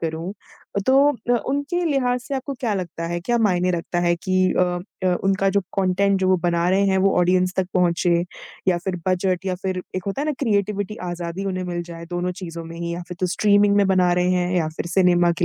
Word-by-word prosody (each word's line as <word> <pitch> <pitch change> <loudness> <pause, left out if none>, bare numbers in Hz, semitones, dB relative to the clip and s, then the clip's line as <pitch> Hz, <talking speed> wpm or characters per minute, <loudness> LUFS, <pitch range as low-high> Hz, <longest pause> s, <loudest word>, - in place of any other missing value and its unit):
करूँ 165 +2 -3 0.5
अ, - - +2
तो 275 +2 +5
अ, 245 -2 0
उनके 285 +6 -1
लिहाज 250 -5 +1
से 275 +2 -5
आपको 270 +1 -3
क्या 225 -5 0
लगता 170 -3 -4
है? 175 +1 -2
क्या 240 +6 0
मायने 185 -5 +2
रखता 175 0 -2
है 175 0 +2
कि 185 +2 -2 0.2
अम, 180 0 0 0.2
अ, 180 -1 +3
उनका 195 0 +2
जो - - +5 0.2
कंटेन्ट 195 +1 +2
जो 185 - +2
वो 185 - +4
बना 170 0 +1
रहे 200 +1 +3
हैं 190 0 +2
वो - - 0
ऑडियंस 180 +1 +2
तक 190 - +1
पहुँचे 175 -1 +2 0.4
या 180 -2 +3
फिर 190 -2 -2
बजट 185 0 0
या 185 - 0
फिर 185 -1 -2
एक 185 - -4
होता 200 +8 -2
है - - -2
ना 305 - +1
क्रीऐटिवटी 205 -3 0
आज़ादी 175 +2 -4
उन्हें 185 -1 -2
मिल 175 -1 -3
जाए 170 0 -8
दोनों 175 +1 -2
चीज़ों 165 -1 -6
में 165 +1 -9
ही 170 0 -3
या 175 - -5
फिर 180 - -7
जो 185 - +2
स्ट्रीमिंग 205 -1 +4
में 200 -1 +4
बना 185 -2 +3
रहे 180 0 +2
हैं 180 0 0
या 160 -3 +1
फिर - - -3
सिनेमा 175 -2 +4
के 175 - +2
185 Hz, 235 wpm, -22 LUFS, 175-200 Hz, 0.5 s, तो